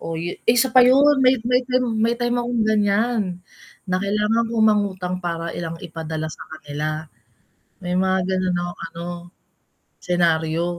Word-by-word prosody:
Oo 165 - -5
yu 175 - -3 0.2
isa 245 +2 +4
pa 255 - +9
yun, 275 +3 +5
may 255 +1 +5
may 250 +1 +3 0.4
may 235 +1 +2
time 240 0 -1
akong 240 -1 -1
ganyan. 210 -2 +1 0.5
Na 185 -1 -1
kailangan 210 +3 0
kong 225 -1 +1
mangutang 195 -4 +1
para 170 -1 -4
lang 165 -1 -5
ipadala 160 -2 -5
sa - - -13 0.2
kanila. 155 +1 -4 0.7
May 180 -2 -4
mga 190 +1 +2
ganon 185 -1 0
akong 175 0 -5
ano, 170 +1 -8 1.0
senario. 165 -2 +1
185 Hz, 145 wpm, -21 LUFS, 170-230 Hz, 1.0 s, pa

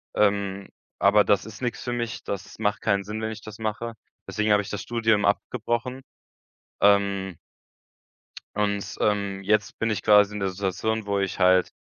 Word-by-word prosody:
Ähm, 100 -1 +1 0.3
aber 100 +1 +5
das 100 0 +2
ist 110 +1 -10
nix 125 -2 -2
für 120 - -2
mich, 120 -3 -3
das 100 +1 -6
macht 105 -2 0
keinen 100 0 +1
Sinn, 105 +2 -5
wenn 110 0 -2
ich 110 - -8
das 110 0 -10
mache, 110 +1 -3 0.3
deswegen 105 0 0
habe 105 0 +5
ich 100 - -8
das 105 - -4
Studium 110 -3 +1
abgebrochen. 120 +4 -1 0.8
Ähm 100 -2 +3 1.2
und, 100 -1 -1
ähm, 100 -2 0
jetzt 105 +1 +1
bin 115 - +1
ich 110 - -1
quasi 105 -1 +5
in 105 - -4
der 95 -1 0
Situation, 100 +3 -2
wo 100 -1 0
ich 95 -1 -2
halt 90 0 +4
105 Hz, 175 wpm, -25 LUFS, 100-110 Hz, 1.2 s, aber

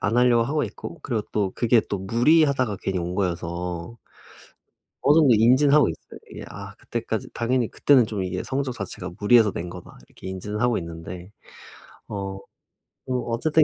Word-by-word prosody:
안 105 +4 0
하려고 120 -1 +4
하고 150 +5 0
있고 170 - -8
그리고 115 -5 -2
또 100 -3 0
그게 120 -1 +3
또 100 - -2
무리하다가 125 - +2
괜히 95 -1 -1
온 90 +1 -3
거여서 90 +1 -3 1.0
어느 145 +2 +4
정도 140 -7 +6
인지는 130 +6 +5
하고 150 -3 +5
있어요. 80 - -9
이게 - - -8
아 - - -9
그때까지 - - -4
당연히 120 0 0
그때는 135 -4 +4
좀 105 -3 -3
이게 90 0 -3
성적 135 -1 -2
자체가 - - -6
'무리해서 110 +1 +5
낸 85 +1 -5
거다.' 90 -1 -11
이렇게 - - -14
인지는 105 +3 -5
하고 120 0 +2
있는데 85 +2 -8 0.8
어 100 -1 -5 0.7
뭐 125 -2 -1
어쨌든 155 +7 +3
110 Hz, 360 characters per minute, -24 LUFS, 95-125 Hz, 1.0 s, 정도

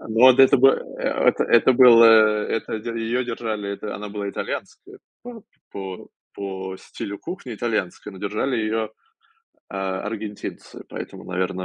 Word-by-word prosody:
М, - - -10
ну 120 +3 +6
ад 130 +1 +5
это 135 +1 +7
бы 135 +2 +7 0.3
э - - -6 0.3
это - - +2
это 120 +2 +4
был, 120 -2 +7
э, 115 - +9 0.5
это 110 0 -4
дь - - -13
её 120 +3 -1
держали, 110 -4 -4
это 105 +1 -6
она 105 +1 -7
была 100 -1 -4
итальянская - - -7 0.2
па 235 -3 -10 0.3
по 95 -2 -7 0.3
по 95 -1 -6
стилю 100 0 -8
кухни- 160 -9 -7
итальянская, 105 -3 -3
но 95 - -11
держали 105 +6 -2
её, 110 0 -1 0.6
э, 100 - -13
аргентинцы, 100 +2 -6
поэтому, - - -8
наверно. 95 0 -3
110 Hz, 160 wpm, -22 LUFS, 100-120 Hz, 0.6 s, э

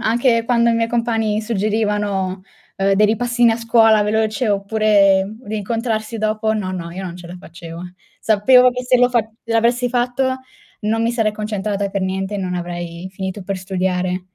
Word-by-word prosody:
Anche 230 0 +2
quando 235 -1 +3
i - - +2
miei 230 0 0
compagni 225 -2 0
suggerivano, 205 -3 -1 0.4
uhm, 195 0 +1
dei 210 +2 +4
ripassini 235 +2 +2
a 225 - +1
scuola 225 -2 +4
veloci, 220 +3 0
oppure 200 -1 +2
rincontrarsi 220 +1 -3
dopo, 220 0 0
no, 200 -4 -3
no, 170 -2 -5
io 185 +3 -7
non 175 -2 -6
ce 175 -1 -11
la 175 +1 -9
facevo. 170 -1 -10 0.4
Sapevo 250 +4 +5
che 250 0 -5
se 250 0 +3
lo 245 0 +3
fa 240 - +3 0.2
l'avessi 235 +2 +1
fatto, 255 +2 0 0.4
non 220 +2 0
mi 230 +1 +1
sarei 225 -3 +1
concentrata 210 -1 -3
per 195 0 -2
niente, 190 +2 -2
e - - -4
non 185 -2 -3
avrei 175 0 -5
finito 190 +1 -5
per 195 0 -4
studiare. 185 -1 -2
215 Hz, 170 wpm, -19 LUFS, 190-230 Hz, 0.4 s, Sapevo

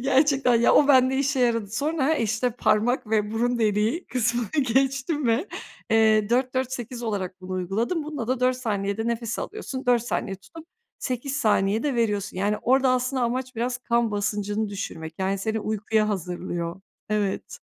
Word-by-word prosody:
Gerçekten 270 -1 +3
ya, - - +5
o 290 - +5
bende 260 -1 +5
işe 275 -1 +1
yaradı. 230 -4 +1
Sonra, 295 +5 0
işte, 225 0 0
parmak 230 +1 +1
ve 210 -1 +1
burun 240 +2 0
deliği 220 - +1
kısmını 240 -2 -1 0.2
geçtim 270 +2 +1
ve, 235 - +1 0.4
eee, 220 -1 +4
4-4-8 255 -1 -1
olarak 195 -5 -3
bunu 185 0 -7
uyguladım. 210 - -1
Bunda 295 -6 -4
da 255 -1 0
4 255 0 +2
saniyede 210 -2 -2
nefes 235 -1 -2
alıyorsun, 275 -11 -5
4 245 -2 +4
saniye 205 -4 -3
tutup, 320 - -14 0.3
8 260 +2 -3
saniyede 220 +1 +1
veriyorsun. 210 -5 -1
Yani, 205 +3 +1
orada 265 +2 +3
aslında 255 +1 0
amaç 255 +2 -2
biraz 245 +2 -1
kan 235 -2 +1
basıncını 205 +1 -1
düşürmek. 165 -5 -6
Yani 190 +1 0
seni 220 +2 -2
uykuya 215 0 0
hazırlıyor. 175 -2 -4 0.3
Evet. 205 -2 -2
235 Hz, 150 wpm, -25 LUFS, 210-255 Hz, 0.4 s, ya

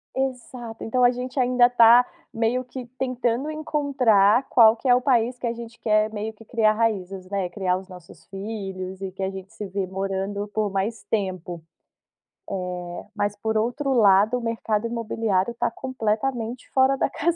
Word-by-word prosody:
Exato. 250 -3 -4
Então 250 +3 +1
a 245 - +7
gente 250 +2 -5
ainda 250 -1 +4
tá 240 0 +7 0.3
meio 230 +3 0
que 250 0 -8
tentando 255 +2 -1
encontrar 265 -8 +2
qual 225 -2 +6
que 260 - -4
é 245 - +7
o 250 - +3
país 245 -2 +1
que 245 - -4
a 230 - 0
gente 230 0 -9
quer 215 0 +2
meio 215 +1 -4
que 220 +1 -16
criar 220 -1 +2
raízes, 195 -4 -2
né, 195 -2 -2
criar 180 0 -1
os 190 +1 -8
nossos 180 -3 -14
filhos, 195 -2 -6
e 195 -1 -4
que 190 - -7
a 190 - 0
gente 190 0 -9
se 210 - -6
vê 195 0 -3
morando 195 +2 -3
por 210 0 -1
mais 195 +2 -2
tempo. 185 -5 -2 1.3
Eh, - - -7
mas 205 -1 -1
por 220 +1 -2
outro 245 +6 0
lado, 210 +1 +5
o - - -6
mercado 230 -1 -1
imobiliário 225 -2 -1
tá - - +1
completamente 240 0 -3
fora 265 +1 +3
da - - +1
casinha, 345 +3 0
225 Hz, 175 wpm, -24 LUFS, 195-245 Hz, 1.3 s, a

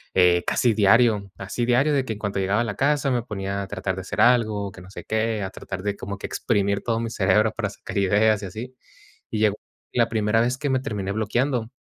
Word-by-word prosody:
eh, 90 -1 +4
casi 120 -2 +2
diario. 105 -1 +4
Así 100 +5 -3
diario, 125 +5 +3
de 135 -2 +1
que 115 - -3
en 105 - -10
cuanto 100 -2 -2
llegaba 100 +4 +1
a - - 0
la 105 -3 -4
casa 140 +2 +1
me 125 -1 +1
ponía 100 -2 -4
a - - -7
tratar 95 +1 -3
de 95 - -5
hacer - - -2
algo, 110 -5 +3
que - - -13
no 90 - -13
sé - - -8
qué, 110 -1 -1
a 95 - -3
tratar 95 -1 -7
de 100 0 -2
como 100 +1 -6
que - - -7
exprimir 100 -3 0
todo 115 -1 0
mi 115 - -3
cerebro 105 +1 +2
para 105 -3 -2
sacar 100 - -8
ideas 105 +2 +3
y - - -4
así. 120 +7 -8 0.6
Y 110 - -2
llegó 105 -1 +2 0.4
la 120 -2 +3
primera 110 0 +1
vez 125 +2 0
que 145 +1 -2
me 130 -1 +2
terminé 105 -7 -3
bloqueando. 115 +3 0
105 Hz, 240 wpm, -24 LUFS, 100-120 Hz, 0.6 s, eh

